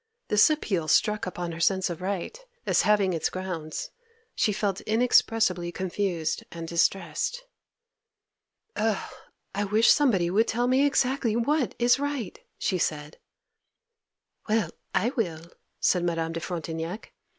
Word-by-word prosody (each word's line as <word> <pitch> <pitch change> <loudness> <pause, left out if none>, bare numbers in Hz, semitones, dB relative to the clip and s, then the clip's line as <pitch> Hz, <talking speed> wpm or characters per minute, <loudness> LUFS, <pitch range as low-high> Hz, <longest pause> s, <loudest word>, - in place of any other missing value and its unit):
This 210 +6 +6
appeal 195 - -1
struck 210 +5 +2
upon 175 -1 -4
her 165 - -7
sense 190 +2 +2
of 175 -1 -6
right, 190 - -3 0.3
as - - +3
having 205 -3 +3
its 165 - 0
grounds. 180 -4 -5 0.4
She 215 - +1
felt 200 -1 -1
inexpressibly 220 -6 +2
confused 180 -3 -2
and 165 -1 -7
distressed. 175 - 0 1.3
'Oh, 215 -2 -1 0.4
I 200 +1 -1
wish 215 +3 +4
somebody 195 -12 +3
would 220 +4 +3
tell 240 +2 0
me 260 +3 +4
exactly 260 -4 +1
what 275 +4 0
is 245 +2 +3
right!' 285 -9 -3 0.2
she 185 - -1
said. 150 -1 -3 1.3
'Well, 215 -6 +1 0.2
I 230 - +2
will!' 170 - -3 0.3
said 180 -2 +2
Madame 165 -1 -1
de 165 - -4
Frontignac. 165 +2 -5
195 Hz, 130 wpm, -27 LUFS, 170-225 Hz, 1.3 s, This